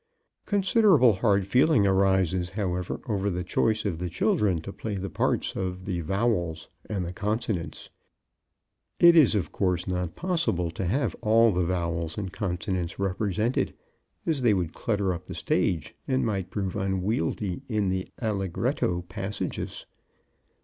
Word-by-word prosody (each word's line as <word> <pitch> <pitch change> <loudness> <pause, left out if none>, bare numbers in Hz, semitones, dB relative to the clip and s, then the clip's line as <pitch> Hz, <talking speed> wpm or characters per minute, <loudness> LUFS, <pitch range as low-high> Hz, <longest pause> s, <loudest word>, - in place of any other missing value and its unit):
Considerable 195 - +5
hard 100 -1 +2
feeling 125 +1 +4
arises, 95 -2 +2
however, 90 -3 -2
over 100 -3 0
the 90 -1 -2
choice 110 +5 +1
of 85 -5 -2
the 90 0 -3
children 95 0 +1
to 100 +5 -8
play 110 -2 -4
the 95 -1 -4
parts - - 0
of 95 0 -4
the 90 -3 -2
Vowels 90 -3 -1 0.2
and 95 -4 -2
the 85 - -5
Consonants. 105 -3 -3 1.1
It 170 0 +8
is, 145 -9 +6
of 90 -7 -1
course, 90 -2 0
not 90 -2 -2
possible 165 - 0
to 95 +3 -4
have 130 +11 0
all 115 0 +5
the 90 -1 0
vowels 85 -2 -2
and 95 -3 -4
consonants 90 -3 -2
represented, 100 +4 0 0.5
as 155 -5 0
they 115 -4 +4
would 85 -3 -2
clutter 100 -4 0
up 85 - -7
the - - -6
stage 80 -4 0
and 130 -1 +1
might 100 -5 -2
prove 95 -3 -3
unwieldy 95 0 -1
in 105 -4 +1
the 95 0 -2
allegretto 95 -4 -1
passages. 95 +4 -4
95 Hz, 145 wpm, -27 LUFS, 90-110 Hz, 1.1 s, It